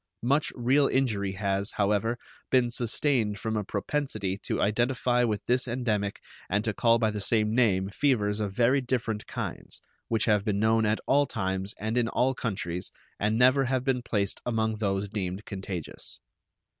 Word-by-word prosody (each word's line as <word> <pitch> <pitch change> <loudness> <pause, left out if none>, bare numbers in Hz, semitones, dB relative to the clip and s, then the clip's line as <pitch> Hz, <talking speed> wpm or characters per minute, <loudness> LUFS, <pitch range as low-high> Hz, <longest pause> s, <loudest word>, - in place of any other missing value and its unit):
Much 140 +5 +2
real 135 +3 +3
injury 105 -7 0
has, 100 +1 -1
however, 105 +3 +1 0.3
been 125 -2 +3
sustained 120 -2 0
from 110 +1 -3
a 105 - 0
propensity 100 -2 -2
to - - -3
identify 120 +3 +1
with 110 -3 -1
this 125 +1 +2
endemic 110 -5 -1 0.3
and 105 +2 0
to 110 - 0
call 115 +2 +3
by 110 -2 +1
the 105 -1 -4
same 110 +1 +2
name 100 -6 +3
fevers 105 -2 +1
of 105 -2 -2
very 125 +6 +3
different 120 -4 -2
kinds, - - -5 0.3
which 115 -1 +1
have 105 -3 +3
been 105 -2 0
known 110 +1 +3
at 105 +1 +1
all 145 +1 +3
times 95 -3 -2
and 110 +3 0
in 120 - +1
all 130 +1 +1
countries, 95 -8 -3 0.3
and 105 +2 +1
never 130 +3 +5
have 130 0 0
been 130 -2 0
placed 100 -5 -1
among 110 -2 0
those 100 -1 -1
deemed 100 -1 -4
contagious. 95 -4 -6
110 Hz, 170 wpm, -28 LUFS, 100-125 Hz, 0.3 s, never